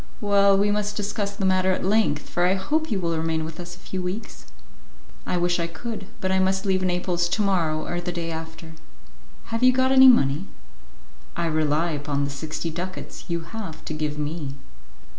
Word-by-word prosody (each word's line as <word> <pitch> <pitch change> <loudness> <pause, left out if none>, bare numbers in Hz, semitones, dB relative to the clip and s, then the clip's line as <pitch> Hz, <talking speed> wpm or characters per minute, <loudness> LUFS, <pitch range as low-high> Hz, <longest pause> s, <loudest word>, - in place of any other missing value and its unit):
"Well, 200 -1 +4
we 205 +1 +3
must 210 0 -1
discuss 205 -1 -2
the 200 -1 -2
matter 185 0 +3
at 185 - -2
length, 205 -7 +2
for 175 0 +1
I 185 - +3
hope 310 +12 -1
you 210 -5 0
will 170 -2 0
remain 160 0 -1
with 160 +1 -8
us 175 0 -7
a - - -18
few 185 +1 -5
weeks." 185 - -6 0.8
"I 180 - 0
wish 175 0 +1
I 170 - 0
could, 200 +4 -6
but 185 - -1
I 190 - +3
must 190 +1 +1
leave 190 -1 +2
Naples 180 -1 0
to 215 - +1
morrow 165 -6 +1
or 175 0 -2
the 175 0 -3
day 170 -1 -3
after." 160 0 -7 0.8
"Have 230 - 0
you 255 0 +7
got 260 +1 +2
any 265 0 +9
money?" 155 - +4 0.9
"I 170 - -1
rely 155 +1 +1
upon 145 -1 -1
the 140 - -2
sixty 160 +3 -4
ducats 180 +3 -6
you 170 -1 -2
have 165 -1 -7
to - - -4
give 150 -1 -2
me." 150 -2 -4
180 Hz, 200 wpm, -24 LUFS, 160-200 Hz, 0.9 s, any